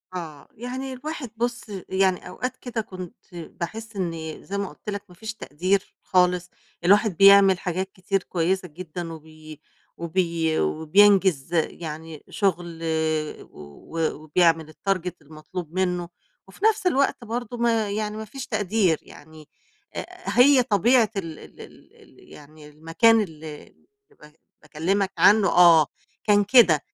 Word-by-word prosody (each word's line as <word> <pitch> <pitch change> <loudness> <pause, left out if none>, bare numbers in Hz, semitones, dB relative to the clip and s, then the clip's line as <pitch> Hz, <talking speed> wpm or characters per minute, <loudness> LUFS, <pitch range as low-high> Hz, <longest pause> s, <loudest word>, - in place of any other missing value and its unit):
آه، 160 -5 -7
يعني 260 +3 -6
الواحد 295 0 -6
بُصّ، 240 +1 -2 0.2
يعني 190 -1 +1
أوقات 255 0 -5
كده 235 -3 -4
كنت 185 -4 -9 0.2
باحس 215 +6 -7
إني 165 -4 -5
زي 200 - -5
ما 200 -1 -3
قُلت 210 - -10
لك 200 0 -4
ما 180 - -16
فيش 220 +4 -6
تقدير 185 +1 -2
خالص، 180 -1 +2 0.3
الواحد 200 0 +3
بيعمل 195 -1 +7
حاجات 185 +2 -3
كتير 190 +1 -2
كويسة 180 +2 -1
جدًا، 170 +1 -7
وبي 155 -1 -13 0.4
وبي 170 -2 -1
وبينجز 175 - +3
يعني 160 -1 -3
شغل 175 -5 -1 0.7
و 115 - -5
وبيعمل 160 0 +1
الtarget 185 -1 -2
المطلوب 155 +3 -9
منه 180 -2 -1 0.4
وفي 410 - -5
نفس 425 -4 +3
الوقت 275 -6 +1
برضه 240 +1 -5
ما 230 -3 +1
يعني 210 0 -3
ما 220 - -6
فيش 265 +5 -8
تقدير، 200 -7 +1
يعني 155 0 -15 0.5
آآ، - - -4 0.3
هي 260 0 +7
طبيعة 230 +2 +3
ال 165 -5 -5
ال - - -14
ال - - -16
ال - - -20
يعني 150 +1 -14
المكان 165 +10 +3
اللي 155 -5 -9 0.5
ب - - -13 0.4
باكلّمك 185 +6 -1
عنه 200 +4 +5
آه، 170 -4 +6 0.4
كان 205 -1 +4
كده، 200 - +6
185 Hz, 135 wpm, -24 LUFS, 160-215 Hz, 0.7 s, بيعمل